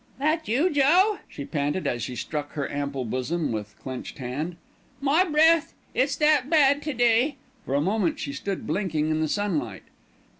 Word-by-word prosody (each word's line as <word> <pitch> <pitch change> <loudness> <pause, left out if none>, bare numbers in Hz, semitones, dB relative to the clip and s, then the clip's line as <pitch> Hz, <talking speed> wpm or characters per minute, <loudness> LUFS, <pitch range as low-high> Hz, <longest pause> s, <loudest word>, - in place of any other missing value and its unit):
"That 310 +4 0
you, 285 +11 +2
Joe?" 350 +9 +4
she 140 - -7
panted 145 +5 -2
as 120 - -1
she 125 +3 -4
struck 145 +3 -4
her 145 -2 -2
ample 140 -2 -3
bosom 130 +7 -2
with 105 -1 -5
clenched 130 -1 -7
hand. 145 +6 -4 0.4
"My 285 +6 +3
breath! 325 -1 +3 0.2
it's - - +1
that 300 -3 +3
bad 285 -3 +4
to 300 -1 -3
day." 245 +4 +3 0.3
For 135 - 0
a 140 - +2
moment 195 +1 0
she 140 - -4
stood 190 +7 -4
blinking 160 -6 -1
in 155 - 0
the 160 - +1
sunlight. 150 - -2
185 Hz, 175 wpm, -25 LUFS, -, 0.4 s, Joe